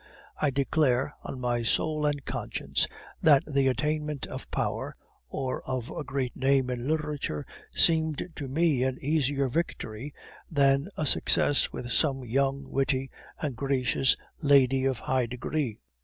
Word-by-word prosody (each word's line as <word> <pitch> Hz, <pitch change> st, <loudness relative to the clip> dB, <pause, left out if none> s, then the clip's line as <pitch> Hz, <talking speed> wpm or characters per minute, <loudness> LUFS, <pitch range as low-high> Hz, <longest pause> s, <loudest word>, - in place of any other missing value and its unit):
I 150 Hz, -, +3 dB
declare, 140 Hz, 0 st, +1 dB
on 130 Hz, -, -6 dB
my 120 Hz, -1 st, 0 dB
soul 150 Hz, +6 st, +1 dB
and 145 Hz, -2 st, -2 dB
conscience, -, -, -1 dB, 0.3 s
that 145 Hz, -4 st, +6 dB
the 140 Hz, -2 st, +2 dB
attainment 150 Hz, +2 st, -1 dB
of -, -, -8 dB
power, -, -, -2 dB, 0.3 s
or 130 Hz, -, -3 dB
of 130 Hz, -2 st, -4 dB
a 155 Hz, -, -4 dB
great 130 Hz, -2 st, -3 dB
name 135 Hz, -1 st, +2 dB
in 125 Hz, +1 st, -3 dB
literature, 150 Hz, -, -2 dB, 0.3 s
seemed 160 Hz, -2 st, +3 dB
to 140 Hz, -, -5 dB
me 150 Hz, -1 st, +2 dB
an 130 Hz, 0 st, 0 dB
easier 140 Hz, -2 st, +1 dB
victory 130 Hz, -3 st, -3 dB, 0.4 s
than 140 Hz, -1 st, +3 dB
a 155 Hz, -, 0 dB
success 145 Hz, +1 st, +3 dB
with 120 Hz, 0 st, -6 dB
some 135 Hz, -4 st, +2 dB
young, 135 Hz, +3 st, 0 dB
witty, 135 Hz, -1 st, 0 dB, 0.3 s
and 145 Hz, -5 st, -2 dB
gracious 135 Hz, 0 st, +2 dB, 0.2 s
lady 135 Hz, -3 st, +4 dB
of 135 Hz, -2 st, +1 dB
high 130 Hz, -1 st, 0 dB
degree. 125 Hz, 0 st, -2 dB
135 Hz, 140 wpm, -28 LUFS, 130-150 Hz, 0.4 s, that